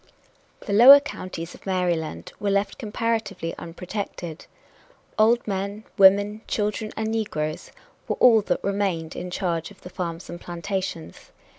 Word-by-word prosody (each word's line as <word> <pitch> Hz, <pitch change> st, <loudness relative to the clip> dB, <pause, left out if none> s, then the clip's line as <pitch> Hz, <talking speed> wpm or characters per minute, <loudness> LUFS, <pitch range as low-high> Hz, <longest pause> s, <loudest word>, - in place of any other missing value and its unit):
The 200 Hz, -, -4 dB
lower 255 Hz, +7 st, +10 dB
counties 185 Hz, -11 st, -7 dB
of -, -, -14 dB
Maryland 170 Hz, -, -2 dB
were 205 Hz, -, -1 dB
left 200 Hz, +4 st, 0 dB
comparatively 225 Hz, -6 st, -2 dB
unprotected. 175 Hz, -1 st, -6 dB, 0.7 s
Old 230 Hz, +2 st, +4 dB
men, 200 Hz, +1 st, -3 dB
women, 200 Hz, +2 st, +5 dB
children 210 Hz, 0 st, -2 dB
and 220 Hz, 0 st, -1 dB
negroes 155 Hz, -9 st, -3 dB, 0.4 s
were -, -, -1 dB
all 230 Hz, -3 st, +6 dB
that -, -, -2 dB
remained 195 Hz, -5 st, -1 dB
in 180 Hz, -, -5 dB
charge 170 Hz, -3 st, -2 dB
of 205 Hz, -, -17 dB
the 180 Hz, -, -10 dB
farms 170 Hz, -1 st, -5 dB
and 175 Hz, 0 st, -8 dB
plantations. 175 Hz, -, -5 dB
195 Hz, 135 wpm, -24 LUFS, 170-215 Hz, 0.7 s, lower